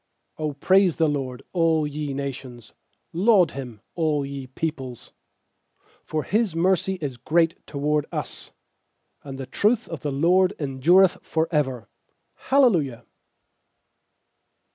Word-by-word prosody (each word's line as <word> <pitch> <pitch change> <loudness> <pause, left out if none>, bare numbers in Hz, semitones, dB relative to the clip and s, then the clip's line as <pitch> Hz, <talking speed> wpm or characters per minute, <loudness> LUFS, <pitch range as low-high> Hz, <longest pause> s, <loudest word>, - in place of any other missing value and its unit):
1 155 - -3
1 150 - -4
*7 - - -38
0 - - -20
praise 190 -2 +5
the 160 - +2
LORD, 135 -4 -3
all 165 -3 +2
ye 150 0 -4
nations; 130 -4 -6 0.4
Laud 190 0 +4
Him, 125 -6 -8
all 155 -4 0
ye 135 -1 -7
peoples. 130 -3 -5 0.6
2 - - -42 0.2
For 155 -1 -2
His 215 -5 0
mercy 190 +2 +1
is 135 -5 -4
great 165 +6 +1
toward 150 0 -1
us; - - -6 0.7
And 135 -2 -8
the 135 - -5
truth 215 - +1
of 165 - -6
the 145 - -3
LORD 180 +7 +3
en 135 -3 -5
dureth 180 +6 +5
for 160 0 -1
ever. 130 -7 -1 0.5
Hallelujah. 180 - +2
150 Hz, 140 wpm, -24 LUFS, 135-175 Hz, 0.7 s, praise